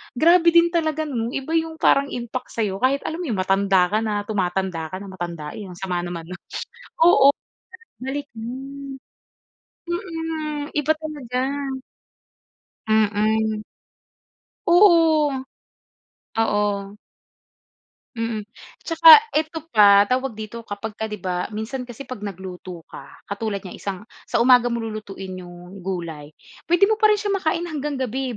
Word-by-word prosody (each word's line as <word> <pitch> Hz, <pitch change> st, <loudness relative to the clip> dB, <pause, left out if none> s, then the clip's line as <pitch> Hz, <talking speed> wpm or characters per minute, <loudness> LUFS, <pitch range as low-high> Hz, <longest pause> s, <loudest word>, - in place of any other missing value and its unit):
Grabe 340 Hz, +5 st, +5 dB
din 340 Hz, 0 st, +6 dB
talaga 315 Hz, -2 st, 0 dB
'no, 240 Hz, -6 st, -2 dB
iba 270 Hz, +3 st, -4 dB
yung 325 Hz, 0 st, 0 dB
parang 280 Hz, 0 st, +4 dB
impact 245 Hz, 0 st, -5 dB
sa'yo 205 Hz, -4 st, -1 dB
kahit 270 Hz, +4 st, +1 dB
alam 320 Hz, +2 st, -4 dB
mo 350 Hz, -, -4 dB
yung 210 Hz, -6 st, -1 dB
matanda 195 Hz, -1 st, +3 dB
ka 215 Hz, -, +2 dB
na, 210 Hz, -2 st, -1 dB
tumatanda 185 Hz, -4 st, -1 dB
ka -, -, -4 dB
na, 195 Hz, -1 st, -9 dB
matandain. 175 Hz, +1 st, -6 dB
Ang -, -, -10 dB
sama 185 Hz, -2 st, -2 dB
naman 175 Hz, -1 st, -5 dB
nun. 185 Hz, +1 st, -8 dB, 0.6 s
Oo, 280 Hz, -5 st, +7 dB, 0.7 s
balik 280 Hz, +2 st, -4 dB
mm. 270 Hz, +4 st, -7 dB, 0.9 s
Mhm, 325 Hz, -5 st, -4 dB
iba 300 Hz, +1 st, +3 dB
talaga. 290 Hz, -6 st, -4 dB, 1.5 s
Mhm. 215 Hz, 0 st, +2 dB, 1.0 s
Oo, 330 Hz, -7 st, +5 dB, 1.0 s
oo. 205 Hz, -2 st, 0 dB, 1.2 s
Mhm, 230 Hz, -2 st, -2 dB, 0.4 s
tsaka 450 Hz, +7 st, +8 dB
eto 315 Hz, +1 st, -1 dB
pa, 205 Hz, -2 st, +7 dB
tawag 255 Hz, +1 st, -1 dB
dito? 220 Hz, +2 st, -7 dB
Kapag 205 Hz, +2 st, -5 dB
ka 220 Hz, -, -1 dB
di 210 Hz, -, -5 dB
ba 180 Hz, -1 st, -3 dB
minsan 235 Hz, +4 st, -5 dB
kasi 240 Hz, +3 st, -8 dB
'pag 255 Hz, -4 st, -8 dB
nagluto 185 Hz, -3 st, -8 dB
ka -, -, -11 dB, 0.2 s
katulad 200 Hz, -1 st, -4 dB
niyan 185 Hz, -, -8 dB
isang 195 Hz, -2 st, -4 dB, 0.3 s
sa -, -, 0 dB
umaga 250 Hz, -1 st, +6 dB
mo 235 Hz, -1 st, -2 dB
lulutuin 195 Hz, -4 st, -7 dB
yung 180 Hz, +2 st, -11 dB
gulay, 170 Hz, -5 st, -5 dB, 0.4 s
pwede 350 Hz, +3 st, +5 dB
mo 435 Hz, +2 st, +1 dB
pa 430 Hz, -, +6 dB
rin 420 Hz, -, +4 dB
siya 410 Hz, -1 st, -2 dB
makain 340 Hz, -3 st, 0 dB
hanggang 295 Hz, -3 st, -3 dB
gabi 260 Hz, -1 st, -3 dB
230 Hz, 140 wpm, -22 LUFS, 200-300 Hz, 1.5 s, tsaka